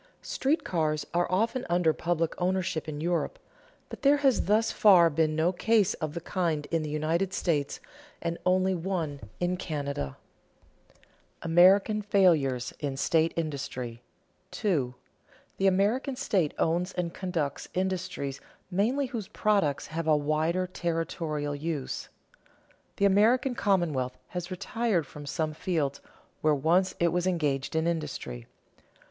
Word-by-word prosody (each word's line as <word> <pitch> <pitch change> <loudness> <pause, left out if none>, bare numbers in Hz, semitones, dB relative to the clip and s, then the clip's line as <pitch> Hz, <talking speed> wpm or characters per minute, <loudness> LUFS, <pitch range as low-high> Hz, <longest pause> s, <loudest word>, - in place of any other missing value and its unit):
Street 285 +5 0
railroads 155 -3 +1
are 175 +1 +1
often 230 +7 +1
under 175 -2 +3
public 165 -1 -1
ownership 180 -4 -1
in 145 -1 -5
Europe; 175 - -1 0.5
but - - -9
there 285 +1 +5
has 275 -3 +2
thus 220 +3 +2
far 180 -6 +6
been 155 +1 +1
no 160 +3 +2
case 210 +1 +2
of 155 0 -5
the 170 - -3
kind 165 -4 -1
in 165 -1 +1
the 155 - -4
United 165 +6 0
States, 145 -5 -1 0.4
and 170 0 -3
only 185 +1 +3
one 170 -5 -2 0.2
in 180 +1 0
Canada. 140 - -4 0.7
[Sidenote: - - -29 0.4
American 190 +6 +5
failures 155 -11 +2
in 140 -2 -3
state 160 +3 +2
industry] 135 -7 -4 0.5
2. 150 - -1 0.6
The 195 - +2
American 210 +8 +2
state 195 - 0
owns 175 +3 0
and 170 -2 -2
conducts 165 -7 -3
industries 185 -7 -2 0.3
mainly 235 +10 +1
whose 230 -6 -5
products 200 -10 +1
have 160 +1 -4
a 155 -1 +5
wider 155 +5 0
territorial 165 -4 -2
use. 145 -1 -4 0.9
The 200 - +2
American 225 +7 +4
commonwealth 165 - 0
has 180 -1 -5
retired 190 -1 -1
from 145 +1 -10
some 155 +1 -1
fields 150 -4 -2 0.4
where 155 -1 +3
once 170 +7 +2
it 170 - +3
was 180 +2 0
engaged 150 -5 0
in 160 0 +1
industry. 150 - -3
170 Hz, 135 wpm, -28 LUFS, 155-190 Hz, 0.9 s, far